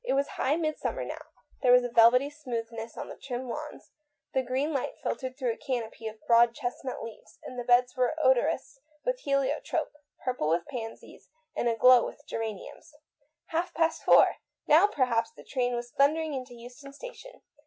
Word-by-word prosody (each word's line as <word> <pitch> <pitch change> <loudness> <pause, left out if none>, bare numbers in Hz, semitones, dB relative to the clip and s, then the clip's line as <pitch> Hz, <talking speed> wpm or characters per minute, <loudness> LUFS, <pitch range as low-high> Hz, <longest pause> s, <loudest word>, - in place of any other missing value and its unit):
It 485 - 0
was 275 +1 +1
high 275 +3 0
midsummer 310 -2 -2
now; - - -6 0.4
there 250 - +4
was 250 0 +7
a - - -1
velvety 240 +4 +5
smoothness 230 -6 -6
on - - -5
the - - -8
trim 255 -1 -5
lawns, 300 +5 -7 0.4
the 265 - +2
green 260 +5 -1
light 275 - -2
filtered 260 -1 -4
through 255 -4 0
a 225 - -6
canopy 230 -4 -4
of 220 0 -7
broad 235 0 +5
chestnut 255 -1 -4
leaves, 225 -2 -11
and 250 - -7
the - - -3
beds 245 +1 +3
were 255 +3 +1
odorous 265 0 +1 0.3
with - - 0
helio 275 - 0
trope, 315 -3 -2 0.3
purple 250 -12 0
with 170 +1 +1
pansies, 230 -5 -8 0.3
and 240 - +1
aglow 245 +2 +6
with - - -5
rosy - - -24
geraniums. 225 - -6 0.6
Four 325 - +2
o'clock! 330 -2 +4 0.4
Now 325 +7 +6
per 280 -10 +1
haps 230 -2 0
the - - -12
train 245 -2 -1
was 240 0 -5
thundering 310 +2 +2
into 255 -2 -6
Euston 245 +4 -12
Station. - - -11
255 Hz, 180 wpm, -28 LUFS, 240-290 Hz, 0.6 s, was